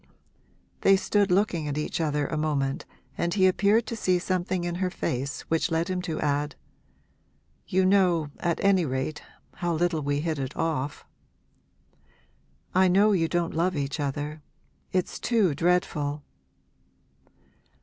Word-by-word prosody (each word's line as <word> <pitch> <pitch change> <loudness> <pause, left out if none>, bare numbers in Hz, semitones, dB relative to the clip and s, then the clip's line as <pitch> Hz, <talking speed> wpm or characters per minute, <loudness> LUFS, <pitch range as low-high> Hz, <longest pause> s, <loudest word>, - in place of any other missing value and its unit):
They 195 - +6
stood 205 +1 +1
looking 180 -4 +1
at 145 0 -3
each 150 +2 -2
other 150 -2 0
a 155 - -3
moment 145 -3 -1 0.3
and 170 0 0
he 190 -2 +4
appeared 205 +4 +3
to 230 - -4
see 185 -4 +2
something 180 0 -1
in 175 0 -2
her 185 - +1
face 140 -5 -3
which 165 0 0
led 165 +2 0
him 185 -1 -1
to 165 -3 -4
add 145 0 0 1.1
'You 185 +1 +2
know, 180 -6 +3
at 170 -1 0
any 195 -2 +4
rate, 130 +1 -3 0.4
how 175 -2 -1
little 170 -1 0
we 145 0 -1
hit 160 -2 -2
it 135 +1 -4
off.' 150 -3 -2 1.7
'I 185 +1 +5
know 200 +4 +4
you 170 -5 +2
don't 175 0 -1
love 175 +3 +1
each 140 +1 -2
other 145 +2 -3 0.5
it's 185 -1 -1
too 215 -9 +2
dreadful.' 150 -3 0
170 Hz, 145 wpm, -26 LUFS, 150-185 Hz, 1.7 s, They